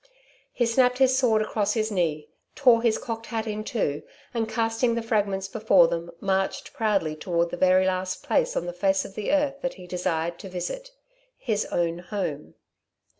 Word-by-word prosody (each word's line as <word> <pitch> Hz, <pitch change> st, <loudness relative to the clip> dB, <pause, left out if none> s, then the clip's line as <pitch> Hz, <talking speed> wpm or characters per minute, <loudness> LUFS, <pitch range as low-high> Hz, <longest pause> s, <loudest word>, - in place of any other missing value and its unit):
He 240 Hz, -, +1 dB
snapped 250 Hz, +2 st, +3 dB
his 260 Hz, -1 st, +4 dB
sword 230 Hz, -5 st, +3 dB
across 210 Hz, -1 st, 0 dB
his 220 Hz, -1 st, 0 dB
knee, 160 Hz, -6 st, -1 dB, 0.3 s
tore 245 Hz, -5 st, +5 dB
his 230 Hz, -2 st, +2 dB
cocked 225 Hz, -1 st, -6 dB
hat 225 Hz, -1 st, -3 dB
in 215 Hz, -1 st, -3 dB
two, 205 Hz, -, -1 dB, 0.3 s
and, 225 Hz, -2 st, -1 dB
casting 230 Hz, +1 st, +1 dB
the 235 Hz, -, -2 dB
fragments 200 Hz, -4 st, 0 dB
before 195 Hz, -4 st, +4 dB
them, 170 Hz, 0 st, -3 dB
marched 190 Hz, 0 st, -1 dB
proudly 200 Hz, -8 st, 0 dB
toward 170 Hz, +1 st, -1 dB
the -, -, -2 dB
very 185 Hz, 0 st, +4 dB
last 185 Hz, 0 st, -2 dB
place -, -, +1 dB
on -, -, -1 dB
the 175 Hz, -, -4 dB
face 190 Hz, +2 st, +1 dB
of 195 Hz, -, -10 dB
the 210 Hz, 0 st, -3 dB
earth 285 Hz, -1 st, +1 dB
that 265 Hz, -, -3 dB
he 185 Hz, -, -11 dB
desired 170 Hz, -1 st, -2 dB
to 195 Hz, -, -8 dB
visit 185 Hz, -, -5 dB, 0.5 s
his 215 Hz, -4 st, -1 dB
own 170 Hz, 0 st, -1 dB
home. 175 Hz, -6 st, -4 dB
205 Hz, 180 wpm, -26 LUFS, 180-230 Hz, 0.5 s, tore